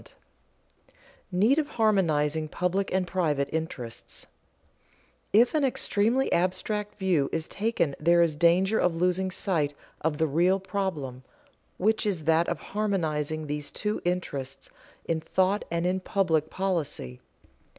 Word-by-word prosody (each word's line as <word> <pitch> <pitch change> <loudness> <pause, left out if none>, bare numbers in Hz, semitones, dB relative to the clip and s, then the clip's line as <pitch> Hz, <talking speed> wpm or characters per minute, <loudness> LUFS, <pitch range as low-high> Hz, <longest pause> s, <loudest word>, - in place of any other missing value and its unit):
[Sidenote: - - -20 1.1
Need 215 - +3
of 300 - -1
harmonizing 160 -8 +2
public 180 +5 -1
and 190 0 +1
private 160 -6 0
interests] 140 -8 -5 1.1
If 235 +4 +5
an 305 -2 +2
extremely 245 0 +1
abstract 185 +4 -1
view 180 -8 +1
is 160 -1 -2
taken 200 -9 -1
there 170 +2 +5
is 160 -3 0
danger 180 +6 +3
of 180 -2 +2
losing 180 +2 +1
sight 165 -7 -1 0.3
of 155 -1 0
the 160 - +2
real 175 +6 +2
problem, 180 -10 -3 0.6
which 215 +2 +1
is 180 -6 -1
that 160 +2 +3
of - - -2
harmonizing 155 -7 -1
these 150 0 -4
two 210 +1 -3
interests 140 -7 -3 0.3
in 160 -1 -1
thought 190 +5 +1
and 170 +1 -1
in 185 +1 +1
public 165 -5 0
policy. 160 - -2
175 Hz, 130 wpm, -27 LUFS, 155-195 Hz, 1.1 s, If